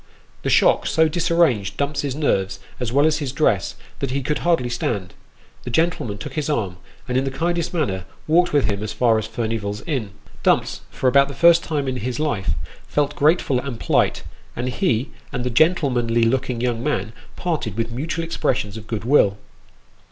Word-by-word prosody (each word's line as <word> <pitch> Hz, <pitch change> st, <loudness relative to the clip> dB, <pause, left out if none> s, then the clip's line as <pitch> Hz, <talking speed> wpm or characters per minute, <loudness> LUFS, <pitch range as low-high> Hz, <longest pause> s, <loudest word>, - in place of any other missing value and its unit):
The -, -, -2 dB
shock -, -, +4 dB
so 160 Hz, 0 st, +3 dB
disarranged 165 Hz, -, +1 dB
Dumps's 140 Hz, -1 st, -1 dB
nerves, 95 Hz, -11 st, 0 dB, 0.2 s
as 125 Hz, -3 st, -2 dB
well 140 Hz, +3 st, +4 dB
as 155 Hz, -1 st, +2 dB
his 140 Hz, -4 st, -3 dB
dress, 115 Hz, -9 st, +1 dB, 0.2 s
that 135 Hz, -, -2 dB
he 135 Hz, +1 st, -2 dB
could 150 Hz, +3 st, -1 dB
hardly 165 Hz, -8 st, +2 dB
stand. 110 Hz, -5 st, -2 dB, 0.5 s
The -, -, -5 dB
gentleman 125 Hz, -7 st, 0 dB
took -, -, -7 dB
his 155 Hz, -1 st, -2 dB
arm, 100 Hz, -11 st, -1 dB, 0.3 s
and 125 Hz, +1 st, +1 dB
in -, -, -1 dB
the 135 Hz, -, -1 dB
kindest 170 Hz, +4 st, -1 dB
manner 100 Hz, -, -1 dB, 0.2 s
walked 175 Hz, +3 st, +3 dB
with 145 Hz, -5 st, +3 dB
him 100 Hz, -1 st, -1 dB
as 105 Hz, 0 st, -4 dB
far 115 Hz, -3 st, +3 dB
as 110 Hz, -, -4 dB
Furnival's 110 Hz, -3 st, -3 dB
Inn. 130 Hz, -10 st, -2 dB, 0.3 s
Dumps, -, -, +2 dB
for 130 Hz, -, -1 dB
about 140 Hz, +2 st, +5 dB
the 140 Hz, -, -8 dB
first 170 Hz, 0 st, +6 dB
time 145 Hz, -4 st, -2 dB
in 130 Hz, -1 st, -1 dB
his 125 Hz, +2 st, -3 dB
life, 100 Hz, -, 0 dB, 0.3 s
felt 145 Hz, 0 st, 0 dB
grateful 145 Hz, -3 st, +3 dB
and 130 Hz, -3 st, -5 dB
polite; -, -, +1 dB, 0.3 s
and 125 Hz, +1 st, -2 dB
he 125 Hz, -, 0 dB, 0.2 s
and 125 Hz, -, -3 dB
the 125 Hz, -, -1 dB
gentlemanly 125 Hz, -6 st, +2 dB
looking 125 Hz, 0 st, 0 dB
young 120 Hz, -1 st, -1 dB
man 140 Hz, -6 st, -1 dB, 0.2 s
parted 155 Hz, -, -2 dB
with 115 Hz, 0 st, -1 dB
mutual 160 Hz, +7 st, -3 dB
expressions 115 Hz, -9 st, -1 dB
of 105 Hz, -1 st, -10 dB
good 110 Hz, -1 st, -4 dB
will. 110 Hz, -7 st, +4 dB
130 Hz, 185 wpm, -22 LUFS, 115-150 Hz, 0.5 s, first